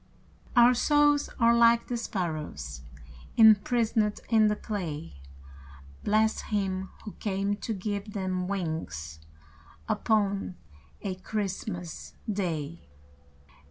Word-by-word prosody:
Our 240 +1 +7
souls 290 +3 +3
are 235 0 +5
like 235 0 +5
the 245 - -2
sparrows 155 - -4 0.6
Imprisoned 220 0 +4
in 220 -2 +5
the 210 - +2
clay, 150 - -5 0.8
Bless 220 +1 +2
Him 190 -2 -2 0.2
who 210 - -5
came 200 0 -1
to 225 - -5
give 205 0 -3
them 185 -2 -2
wings 160 - -4 0.7
Upon 200 -4 0 0.5
a 195 - -2
Christmas 185 -3 -5
Day! 170 - -3
200 Hz, 95 wpm, -28 LUFS, 180-220 Hz, 0.8 s, Our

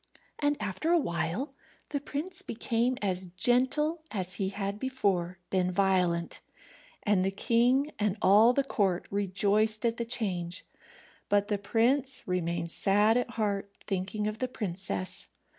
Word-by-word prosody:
And 290 0 +1
after 210 - -2
a 345 - +5
while 175 - -2 0.4
the 285 - -1
prince 320 +7 -4
became 240 - -1
as 185 -2 +2
gentle 255 - +2
as 185 -3 -2
he 190 -1 0
had 200 +1 -4
before 195 -9 -1
been 185 -1 +2
violent. 180 -3 +1 0.6
And 205 -3 +2
the 190 - +2
king 245 +8 +2
and 210 -1 0
all 210 +5 +6
the 275 +2 +1
court 195 -9 0
rejoiced 205 +3 +1
at 230 0 +1
the 235 - -2
change; 190 -7 -2 0.6
but 205 0 +2
the 205 -2 0
prince 250 +6 +1
remained 170 -2 -1
sad 205 +5 +3
at 245 0 0
heart, 205 -4 -2 0.2
thinking 195 +2 -2
of 215 0 -4
the 255 - 0
princess. 180 - -4
205 Hz, 140 wpm, -29 LUFS, 185-245 Hz, 0.6 s, all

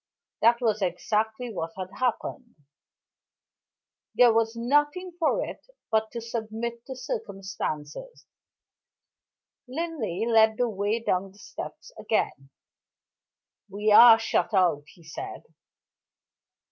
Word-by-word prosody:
That 235 +2 +4
was 215 -3 +1
exactly 220 +6 -1
what 165 -3 -4
had 185 0 -6
happened. 250 0 -2 1.6
There 245 -2 +6
was 225 0 +1
nothing 295 +9 +1
for 365 +9 +1
it - - -9 0.3
but 220 0 +1
to 235 - -4
submit 230 +1 -5
to 265 - -6
circumstances. 195 - -6 1.4
Linley 260 - -3
led 220 -1 +4
the 245 - +1
way 205 +2 -1
down 190 -3 -1
the - - -21
steps 350 - -9
again. 135 -10 -1 1.2
"We 210 +2 0
are 230 +1 +10
shut 225 -1 0
out," 175 -6 +2
he 170 - -18
said. 355 - -8
225 Hz, 110 wpm, -26 LUFS, 195-245 Hz, 1.6 s, are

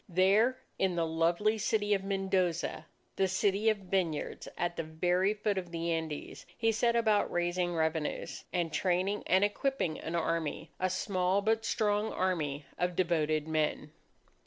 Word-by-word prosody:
There 200 +8 +4 0.2
in 190 -2 +1
the 170 -1 +1
lovely 170 +7 +1
city 210 0 +1
of 195 -1 0
Mendoza, 190 -3 -1 0.3
the 190 - +3
city 200 +3 +2
of 215 - +2
vineyards, 185 -5 -2
at 175 0 -1
the - - -2
very 180 +5 +1
foot 210 -2 0
of 180 -2 -8
the 170 0 -2
Andes, 160 -2 -4
he 225 -1 +2
set 235 +1 +2
about 220 -3 +2
raising 175 0 0
revenues, 160 -1 -2
and 170 -3 -1
training 185 +4 +1
and 190 +2 +4
equipping 205 - 0
an 165 - -4
army 165 -1 -2
a 185 - +1
small 185 +1 0
but 220 +1 +1
strong 210 -1 +1
army 150 -6 -1
of 180 0 0
devoted 155 -4 +1
men. 155 -1 -1
185 Hz, 155 wpm, -31 LUFS, 165-205 Hz, 0.3 s, There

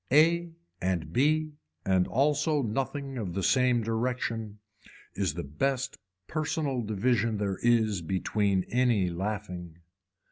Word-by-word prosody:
A 170 +4 +4 0.3
and 85 -4 -1
B 155 +4 +2 0.3
and 95 -1 +3
also 145 +2 +2
nothing 135 +3 -3
of 90 -6 -4
the 95 - -1
same 125 -1 +3
direction 115 -2 -2 0.6
is 95 -6 -1
the 85 - -3
best 130 - -2 0.3
personal 150 -4 -1
division 110 +1 +1
there 100 -2 -2
is 110 -5 +3
between 95 +2 0
any 120 -7 +2
laughing. 90 -2 -4
115 Hz, 115 wpm, -29 LUFS, 95-135 Hz, 0.6 s, A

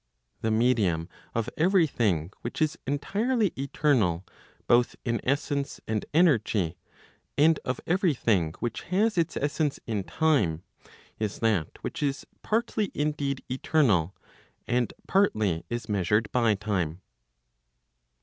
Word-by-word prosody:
The 110 - 0
medium 110 -8 +2 0.3
of 115 -1 0
every 180 +1 +5
thing 95 - 0
which 120 - -5
is 155 0 +1
entirely 205 - 0
eternal 130 - +1 0.4
both 120 0 +3
in 115 -1 0
essence 140 +1 -1
and 110 -1 -1
energy, 110 - +3 0.6
and 155 +2 +5
of 130 0 -2
every 175 -3 +2
thing 90 -9 +1
which 120 - -3
has 210 +4 +2
its 170 -3 0
essence 145 0 0
in 105 -4 -2
time, 100 - +1 0.6
is 105 -2 -2
that 105 -9 +1
which 165 - -4
is 140 -1 -1 0.2
partly 220 -2 0
indeed 145 -2 -1
eternal, 125 - +2 0.5
and 120 -1 +1 0.2
partly 110 - +2
is 120 0 -4
measured 105 +2 +1
by 115 -4 +3
time. 95 -5 -2
120 Hz, 120 wpm, -27 LUFS, 105-155 Hz, 0.6 s, every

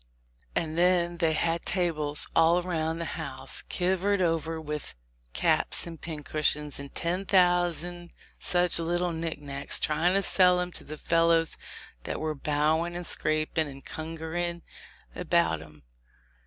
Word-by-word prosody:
And 160 0 -1
then 175 -1 +3
they 165 -2 +2
had 165 +2 0
tables 155 -5 +1
all 165 +1 +5
around 165 -3 -1
the 165 -2 -4
house - - -4
kivered 190 +2 +1
over 165 -2 0
with 150 -1 -5
[ - - -39
] - - -38
caps - - +3
and 165 -2 -9
pincush 155 -2 0
ions 150 -2 -7
and 140 0 -9
ten 175 +3 0
thousands 175 -2 +2 0.3
such 175 -2 +1
little 175 +1 0
knic 165 0 -3
knacks, 140 -1 -3
tryin' 165 +4 +1
to 195 - +2
sell 180 -2 +5
'em 180 0 -2
to - - -8
the 155 +1 -8
fellows 165 0 +2 0.5
that - - -3
were 155 0 -2
bowin' 155 +4 0
and 175 0 -5
scrapin' 155 0 0
and 135 -1 -11
kungeerin' 165 +2 -4 0.5
about 80 -1 +1
'em. 75 -2 -15
165 Hz, 150 wpm, -28 LUFS, 155-175 Hz, 0.5 s, all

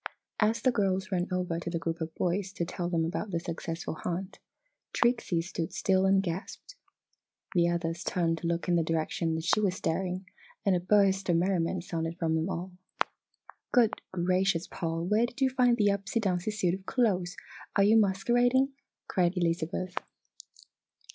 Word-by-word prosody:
As 220 +1 +2
the 255 - +5
girls 195 -2 0
ran 180 -1 0
over 180 -2 -1
to 170 - -4
the 170 - -1
group 165 0 -3
of 160 0 -4
boys 185 +2 -1
to 175 - -2
tell 175 0 -3
them 165 -2 +1
about 180 +5 -3
their 170 -3 -1
successful 165 0 -4
hunt, 185 +2 -3 0.5
Trixie 235 -8 +1
stood 165 -2 -4
still 190 0 +2
and 195 0 +4
gasped. 185 - -6 0.8
The 170 -2 +4
others 170 0 -2
turned 165 -3 0
to 170 - -3
look 170 +1 -1
in 175 - +3
the - - +3
direction 165 0 -1
that 160 - -3
she 175 - +3
was 195 -4 +1
staring 185 +2 -2 0.4
and 195 -2 +4
a - - +2
burst 195 0 +3
of 175 - +4
merriment 175 0 +1
sounded 165 -1 -3
from 165 -2 0
them 160 +3 0
all. 185 0 -4 1.0
"Good 235 -3 +3
gracious, 185 0 +1
Paul! 165 -2 -3
Where 215 +5 +3
did 245 - -12
you 265 -1 +3
find 245 -2 +3
the 205 -2 +4
upsey 200 +3 -1
downsey 185 -2 0
suit 205 -5 0
of 190 0 -6
clothes 185 -8 +1 0.4
are 200 - +5
you 210 +3 +5
masquerading?" 240 +6 +3 0.4
cried 180 0 +1
Elizabeth. 175 +1 -1
180 Hz, 175 wpm, -29 LUFS, 170-200 Hz, 1.0 s, the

